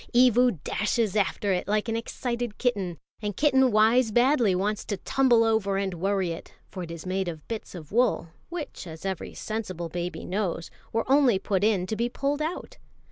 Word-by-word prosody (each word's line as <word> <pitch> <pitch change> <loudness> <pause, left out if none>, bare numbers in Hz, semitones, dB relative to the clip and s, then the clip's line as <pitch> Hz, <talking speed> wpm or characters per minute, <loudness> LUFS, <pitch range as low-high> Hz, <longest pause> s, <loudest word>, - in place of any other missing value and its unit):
Evu 245 -3 +5
dashes 215 -1 0
after 200 0 +1
it 180 - -2
like 210 +2 +1
an 225 - -1
excited 235 0 -3
kitten, 200 -9 -1 0.2
and 205 -2 -3
kitten 265 -4 +4
wise 220 +3 +4
badly 240 -3 +3
wants 205 +3 -1
to 205 - -3
tumble 245 -2 +3
over 220 -3 +1
and 195 -1 -1
worry 190 0 0
it; 165 - -8 0.2
for 185 - -6
it 170 - -6
is 170 0 -7
made 190 0 -1
of 160 -3 -6
bits 225 -4 -6
of 160 -4 -9
wool, 235 -6 +2 0.2
which, 320 - -6
as 160 +2 -9
every 190 -3 -4
sensible 185 -6 -4
baby 175 +1 -4
knows, 180 -4 -2 0.2
were 225 - 0
only 265 -5 +5
put 190 0 -1
in 205 -4 +2
to 220 - -3
be 235 +2 0
pulled 280 +4 -1
out. 355 +10 -4
210 Hz, 190 wpm, -27 LUFS, 185-240 Hz, 0.2 s, Evu